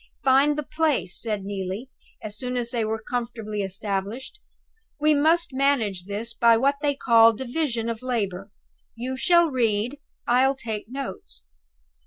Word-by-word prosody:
"Find 275 Hz, +3 st, +4 dB
the 300 Hz, -, -2 dB
place," 305 Hz, -, 0 dB
said 210 Hz, -4 st, -2 dB
Neelie, 200 Hz, +5 st, -5 dB, 0.3 s
as 210 Hz, -1 st, -6 dB
soon 250 Hz, +2 st, -3 dB
as 235 Hz, -1 st, -2 dB
they 235 Hz, -2 st, 0 dB
were 220 Hz, 0 st, -3 dB
comfortably 230 Hz, -4 st, -3 dB
established. 200 Hz, -, -4 dB, 0.6 s
"We 305 Hz, +1 st, +4 dB
must 315 Hz, +2 st, +2 dB
manage 245 Hz, -10 st, +1 dB
this 210 Hz, +4 st, -3 dB
by 230 Hz, 0 st, +5 dB
what 275 Hz, +4 st, +2 dB
they 290 Hz, -2 st, +1 dB
call 230 Hz, -4 st, +6 dB
a 225 Hz, -, -3 dB
division 245 Hz, -3 st, -2 dB
of 230 Hz, -1 st, -3 dB
labor. 200 Hz, -6 st, -2 dB, 0.5 s
You 250 Hz, +3 st, -4 dB
shall 340 Hz, +3 st, +4 dB
read, 235 Hz, +1 st, 0 dB, 0.3 s
and 245 Hz, -, +3 dB
I'll 265 Hz, +1 st, +3 dB
take 220 Hz, -4 st, -5 dB
notes." 260 Hz, -, -6 dB
240 Hz, 155 wpm, -24 LUFS, 215-275 Hz, 0.6 s, call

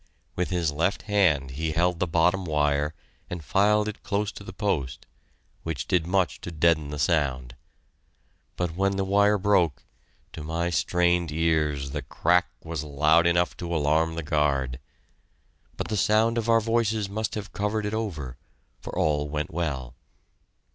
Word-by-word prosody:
With 90 Hz, -, -1 dB
his 85 Hz, -4 st, 0 dB
left 85 Hz, +7 st, 0 dB
hand 90 Hz, -11 st, +2 dB
he 80 Hz, +4 st, -2 dB
held 85 Hz, +2 st, +1 dB
the 90 Hz, -, 0 dB
bottom 90 Hz, +4 st, +2 dB
wire 75 Hz, -1 st, 0 dB, 0.3 s
and 90 Hz, -3 st, -5 dB
filed 105 Hz, +7 st, +3 dB
it 105 Hz, -, -6 dB
close 100 Hz, 0 st, -1 dB
to -, -, -11 dB
the 95 Hz, -, -8 dB
post, 90 Hz, -, -2 dB, 0.6 s
which 80 Hz, -6 st, -4 dB
did 90 Hz, -4 st, +1 dB
much 95 Hz, -1 st, 0 dB
to -, -, -6 dB
deaden 80 Hz, -2 st, +2 dB
the 75 Hz, -, -5 dB
sound, 65 Hz, -5 st, 0 dB, 1.0 s
but 90 Hz, -2 st, -2 dB
when 95 Hz, +1 st, +1 dB
the 95 Hz, -, 0 dB
wire 100 Hz, +2 st, +3 dB
broke, 90 Hz, -9 st, +2 dB, 0.5 s
to 80 Hz, -, -7 dB
my 85 Hz, +3 st, -2 dB
strained 90 Hz, -1 st, +1 dB
ears 75 Hz, -3 st, 0 dB
the -, -, -3 dB
crack 90 Hz, +2 st, +2 dB, 0.2 s
was 80 Hz, -2 st, -4 dB
loud 75 Hz, +3 st, +3 dB
enough 85 Hz, +1 st, +2 dB
to 85 Hz, -1 st, -4 dB
alarm 80 Hz, +2 st, +1 dB
the 85 Hz, -, -4 dB
guard. 70 Hz, -4 st, 0 dB, 1.0 s
But -, -, -4 dB
the 105 Hz, -, -1 dB
sound 110 Hz, +3 st, +3 dB
of 115 Hz, 0 st, -3 dB
our 115 Hz, 0 st, +5 dB
voices 110 Hz, -2 st, 0 dB
must 110 Hz, +2 st, -3 dB
have 105 Hz, -2 st, -6 dB
covered 105 Hz, +1 st, -1 dB
it 105 Hz, -, -3 dB
over, 80 Hz, -, -4 dB, 0.4 s
for -, -, -8 dB
all 75 Hz, -1 st, +1 dB
went 75 Hz, +2 st, -3 dB
well. 70 Hz, -8 st, -3 dB
85 Hz, 160 wpm, -26 LUFS, 75-100 Hz, 1.0 s, our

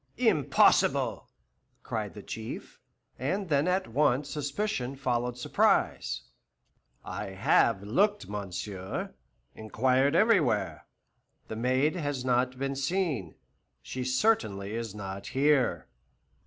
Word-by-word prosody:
"Impossible!" -, -, +3 dB, 0.5 s
cried -, -, -4 dB
the -, -, -9 dB
Chief, 110 Hz, 0 st, -7 dB, 0.4 s
and 180 Hz, +9 st, -2 dB
then 145 Hz, +2 st, +2 dB
at 185 Hz, +1 st, +1 dB
once 140 Hz, +2 st, +1 dB
suspicion 145 Hz, -2 st, -2 dB
followed 125 Hz, -2 st, -1 dB
surprise. 65 Hz, -, +1 dB, 0.8 s
"I -, -, -4 dB
have 95 Hz, +2 st, +2 dB
looked, 200 Hz, -, +1 dB
monsieur, 95 Hz, -1 st, -5 dB, 0.4 s
inquired 130 Hz, +6 st, +1 dB
everywhere; 110 Hz, -, +2 dB, 0.6 s
the 110 Hz, -, -4 dB
maid 130 Hz, +7 st, +1 dB
has 145 Hz, -6 st, -3 dB
not 125 Hz, 0 st, +1 dB
been 135 Hz, +1 st, -2 dB
seen. 140 Hz, -, -1 dB, 0.5 s
She 130 Hz, -, -4 dB
certainly 125 Hz, -, +1 dB
is 115 Hz, -3 st, -4 dB
not 95 Hz, -1 st, -6 dB
here." 140 Hz, 0 st, +2 dB
130 Hz, 100 wpm, -29 LUFS, 110-145 Hz, 0.8 s, Impossible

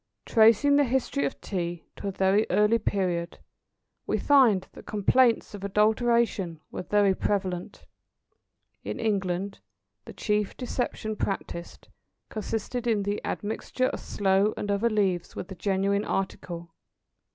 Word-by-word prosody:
Tracing 230 Hz, +5 st, +5 dB
the 290 Hz, -, +5 dB
history 245 Hz, -, 0 dB
of 140 Hz, -, -4 dB
Tea 175 Hz, -3 st, -4 dB
to -, -, -6 dB
a -, -, -1 dB
very 195 Hz, +3 st, +2 dB
early 210 Hz, +2 st, +3 dB
period, 180 Hz, -5 st, -1 dB, 0.7 s
we -, -, +1 dB
find 240 Hz, -10 st, +4 dB
that -, -, -14 dB
complaints 230 Hz, +4 st, +3 dB
of 200 Hz, -1 st, -8 dB
adulteration 210 Hz, -3 st, +1 dB
were -, -, -4 dB
very 200 Hz, +1 st, +3 dB
prevalent. 185 Hz, -3 st, -2 dB, 1.0 s
In -, -, -5 dB
England 195 Hz, -3 st, -1 dB, 0.5 s
the -, -, -9 dB
chief 210 Hz, -2 st, -1 dB
deception 245 Hz, -3 st, -3 dB
practised, 185 Hz, -4 st, -5 dB, 0.4 s
consisted 225 Hz, +3 st, -3 dB
in 215 Hz, -3 st, +2 dB
the 205 Hz, +1 st, -2 dB
admixture 225 Hz, +4 st, -2 dB
of -, -, -5 dB
sloe 195 Hz, +1 st, +1 dB
and 205 Hz, -, -2 dB
other 205 Hz, +4 st, +2 dB
leaves 195 Hz, -5 st, 0 dB
with 180 Hz, -, -6 dB
the -, -, -6 dB
genuine 195 Hz, +2 st, 0 dB
article. 170 Hz, -4 st, -4 dB
205 Hz, 130 wpm, -27 LUFS, 190-220 Hz, 1.0 s, Tracing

